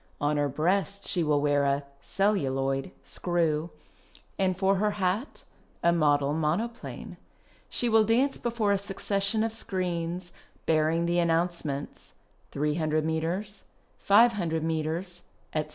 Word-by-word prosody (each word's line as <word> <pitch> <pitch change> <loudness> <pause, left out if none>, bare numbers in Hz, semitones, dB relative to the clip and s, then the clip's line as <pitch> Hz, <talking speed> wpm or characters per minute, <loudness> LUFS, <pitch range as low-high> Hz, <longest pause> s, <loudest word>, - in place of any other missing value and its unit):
On 145 +1 +1
her 145 -1 +1
breast 195 +7 0
she 180 - +1
will 150 -2 +2
wear 145 -1 +2
a 140 0 +1 0.2
(celluloid) 135 -9 0
screw, 165 -2 -1 0.7
and 185 -2 +1
for 195 0 +2
her 210 +1 0
hat 195 +7 -1 0.4
a 170 - +5
model 145 -3 +2
monoplane. 175 +10 -3 0.5
She 245 - 0
will 225 -1 +5
dance 245 +6 +2
before 230 -3 0
a 200 - +2
succession 200 +1 -1
of 225 -1 -1
screens, 180 -4 -3 0.3
bearing 160 +1 +2
the 175 +1 +1
announcements 165 -4 -1 0.4
300 155 +1 0
metres, 175 +6 -2 0.3
500 200 -7 +3
metres, 165 +3 -2 0.3
etc. 155 -1 -1
170 Hz, 120 wpm, -28 LUFS, 155-200 Hz, 0.7 s, a